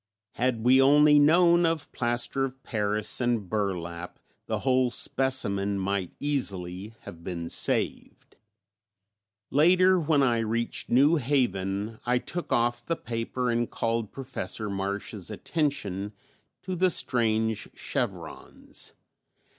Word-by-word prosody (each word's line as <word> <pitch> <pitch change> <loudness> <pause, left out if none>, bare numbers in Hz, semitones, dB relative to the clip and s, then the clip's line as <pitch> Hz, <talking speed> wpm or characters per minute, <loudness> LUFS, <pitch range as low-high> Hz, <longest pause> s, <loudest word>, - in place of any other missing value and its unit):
Had 120 -2 -1
we 130 +2 +6
only 150 +2 +6
known 170 +3 +5
of 165 -2 -1
plaster 120 +3 -1
of 135 0 -5
paris 105 0 -1
and 120 -5 0
burlap 90 -4 -3 0.3
the - - -2
whole 130 -1 +2
specimen 100 -7 +1
might 95 -1 -2
easily 100 -8 -2
have 85 0 -11
been 85 -2 -5
saved. - - -2 1.2
Later, 185 +5 +5
when 150 -3 +2
I 120 -3 +2
reached 115 +1 -2
New 145 +7 +4
Haven, 110 -6 -1
I 125 +1 +1
took 175 +7 -5
off 120 0 +1
the 165 - -1
paper 120 0 -3
and 120 0 0
called 115 -2 -2
Professor 115 -5 -4
Marsh's 100 0 -4
attention 105 - -2 0.5
to 185 0 -4
the 185 +1 +3
strange 110 - +1
chevrons. - - -5
120 Hz, 115 wpm, -27 LUFS, 100-140 Hz, 1.2 s, we